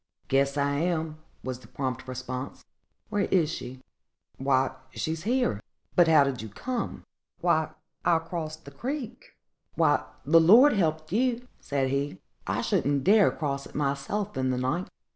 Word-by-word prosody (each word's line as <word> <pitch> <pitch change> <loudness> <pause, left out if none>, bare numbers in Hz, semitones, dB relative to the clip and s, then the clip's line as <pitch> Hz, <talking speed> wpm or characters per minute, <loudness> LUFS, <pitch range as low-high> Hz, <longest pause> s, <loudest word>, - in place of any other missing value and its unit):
"Guess 140 +1 +2
I 140 0 +1
am," 160 -1 -1 0.2
was 130 -1 -4
the - - -16
prompt 130 -2 -4
response; 130 +1 -6 0.4
"where 205 -2 +1
is 165 -4 +2
she?" 130 -4 -7 0.6
"Why, 130 -1 +2
she's 160 +5 -4
here." 240 - +1 0.3
"But 175 -2 +6
how 155 -3 +7
did 135 -4 -2
you 110 - -7
come?" 245 - -4 0.4
"I - - +3 0.4
crossed 165 -2 -1
the 140 - -10
creek." 245 - -6 0.4
"Why, - - +3 0.2
the 165 - +6
Lord 230 - +8
helped 155 -5 0
you!" 245 +3 +1
said 135 -2 -1
he; 140 -5 -2 0.3
"I - - 0
shouldn't 140 0 +1
dare 205 +1 +6
cross 140 -3 -3
it - - -18
myself 145 +9 -1
in 130 0 0
the 130 - 0
night. 130 +9 -1
155 Hz, 150 wpm, -27 LUFS, 135-185 Hz, 0.6 s, Lord